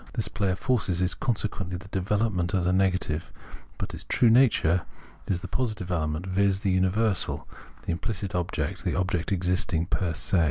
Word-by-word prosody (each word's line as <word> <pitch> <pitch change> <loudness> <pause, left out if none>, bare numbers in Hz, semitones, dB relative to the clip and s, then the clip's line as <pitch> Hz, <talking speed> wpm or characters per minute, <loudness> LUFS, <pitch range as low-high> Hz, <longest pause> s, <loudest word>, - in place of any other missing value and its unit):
This 115 - -1
play 100 -3 -1
of 90 - 0
forces 100 -9 0
is 90 0 +1
consequently 100 -5 -2
the 90 +2 -11
development 95 -2 0
of 95 - +1
the 90 - +2
negative; 90 -4 +1 0.5
but - - -4
its - - -4
true 120 -2 +3
nature 110 -9 +4 0.5
is 90 -2 0
the 90 - -6
positive 105 -4 -2
element, 80 0 -1
viz. 95 +1 +2
the 100 -3 +1
universal, 95 +2 +1 0.4
the - - -2
implicit 100 +2 -3
object, 90 -1 -2
the 90 - 0
object 90 -2 -1
existing 90 -3 +1
'per 85 -2 -1
se. 95 - +1
95 Hz, 170 wpm, -27 LUFS, 90-100 Hz, 0.5 s, nature